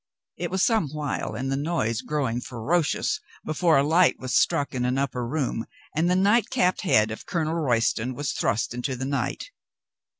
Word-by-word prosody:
It -, -, -3 dB
was 190 Hz, 0 st, 0 dB
some 220 Hz, -, +2 dB
while, 145 Hz, -6 st, -3 dB
and 135 Hz, +4 st, -3 dB
the -, -, +1 dB
noise 140 Hz, -7 st, -1 dB
growing 130 Hz, -6 st, -1 dB
fero 130 Hz, +9 st, 0 dB
cious, 150 Hz, -, -1 dB, 0.3 s
before 160 Hz, +1 st, +3 dB
a 135 Hz, -, +4 dB
light 165 Hz, +5 st, +4 dB
was 130 Hz, -1 st, -5 dB
struck 140 Hz, -, +2 dB
in 125 Hz, -1 st, -1 dB
an 125 Hz, +1 st, 0 dB
upper 130 Hz, -3 st, -1 dB
room, 130 Hz, -4 st, -2 dB, 0.3 s
and 165 Hz, +3 st, +2 dB
the 180 Hz, -, +3 dB
night 205 Hz, +4 st, +3 dB
capped 185 Hz, -8 st, +1 dB
head 110 Hz, -, +3 dB
of 110 Hz, -, -8 dB
Colonel 160 Hz, -2 st, -1 dB
Royston 125 Hz, -5 st, 0 dB
was 145 Hz, +2 st, -2 dB
thrust 110 Hz, -, -1 dB
into 125 Hz, +2 st, -3 dB
the 130 Hz, +1 st, -4 dB
night. 140 Hz, -, -3 dB
140 Hz, 190 wpm, -25 LUFS, 125-165 Hz, 0.3 s, a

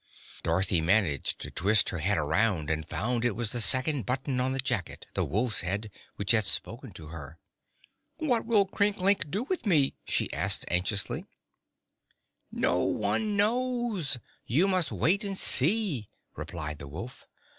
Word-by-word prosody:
Dorothy 85 Hz, +1 st, +1 dB
managed 85 Hz, -5 st, +1 dB
to -, -, -6 dB
twist 105 Hz, +3 st, +2 dB
her 95 Hz, -, -4 dB
head 95 Hz, +6 st, 0 dB
around 80 Hz, +2 st, 0 dB
and 80 Hz, 0 st, -3 dB
found 120 Hz, +1 st, -2 dB
it 120 Hz, -4 st, 0 dB
was 115 Hz, -2 st, -1 dB
the 120 Hz, -, +2 dB
second 130 Hz, +3 st, +3 dB
button 130 Hz, 0 st, -2 dB
on 130 Hz, +1 st, +1 dB
the 135 Hz, -, -2 dB
jacket 120 Hz, -8 st, -2 dB
the -, -, -1 dB
wolf's 110 Hz, -, +1 dB
head 100 Hz, +4 st, -3 dB, 0.2 s
which 100 Hz, -1 st, -1 dB
had 110 Hz, -3 st, +3 dB
spoken 95 Hz, -, -1 dB
to 80 Hz, -2 st, -11 dB
her. 80 Hz, -1 st, -10 dB, 0.8 s
"What 255 Hz, -8 st, 0 dB
will 210 Hz, -4 st, +4 dB
Crinklink 200 Hz, -4 st, +2 dB
do 200 Hz, +9 st, -2 dB
with 340 Hz, -, -3 dB
me?" 150 Hz, -8 st, +3 dB
she -, -, -1 dB
asked 95 Hz, +6 st, +1 dB
anxiously. 95 Hz, +4 st, -1 dB, 1.2 s
"No -, -, 0 dB
one 200 Hz, -, 0 dB
knows. 225 Hz, -, 0 dB, 0.3 s
You 155 Hz, -, +3 dB
must 185 Hz, -4 st, +2 dB
wait 195 Hz, +6 st, +1 dB
and 195 Hz, -1 st, -3 dB
see," 160 Hz, -, +3 dB, 0.3 s
replied 75 Hz, -3 st, -6 dB
the 70 Hz, -, -9 dB
wolf. 95 Hz, -, -9 dB
120 Hz, 155 wpm, -28 LUFS, -, 1.2 s, will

